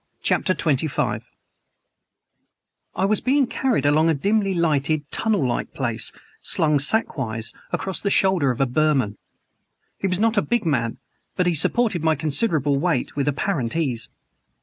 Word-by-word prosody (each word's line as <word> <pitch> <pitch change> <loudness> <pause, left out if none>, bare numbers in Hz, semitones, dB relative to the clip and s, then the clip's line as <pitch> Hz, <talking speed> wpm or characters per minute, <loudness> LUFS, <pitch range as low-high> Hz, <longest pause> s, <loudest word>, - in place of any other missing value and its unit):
CHAPTER 185 - +2
XXV 135 -8 0 1.7
I 190 - +1
WAS 210 +1 +1
being 275 +2 +2
carried 240 - -1
along 155 +3 +3
a 160 - +2
dimly 200 +5 0
lighted, 155 -2 +1
tunnel 210 - +1
like 120 - -3
place, 115 -4 0 0.3
slung, 150 -2 +3
sackwise, 135 - +1 0.2
across 190 -1 -3
the 200 - 0
shoulder 190 -8 +2
of 125 - -2
a 135 - +3
Burman. 130 -6 0 0.8
He 195 - -1
was 180 0 0
not 225 +1 +1
a - - +5
big 240 -2 -1
man, 120 -7 -1 0.4
but 180 - +1
he 175 - +2
supported 185 +3 +1
my 160 -1 +3
considerable 150 - 0
weight 165 -5 -1
with 140 0 -1
apparent 145 - -1
ease. 130 -9 -1
155 Hz, 150 wpm, -22 LUFS, 135-195 Hz, 1.7 s, a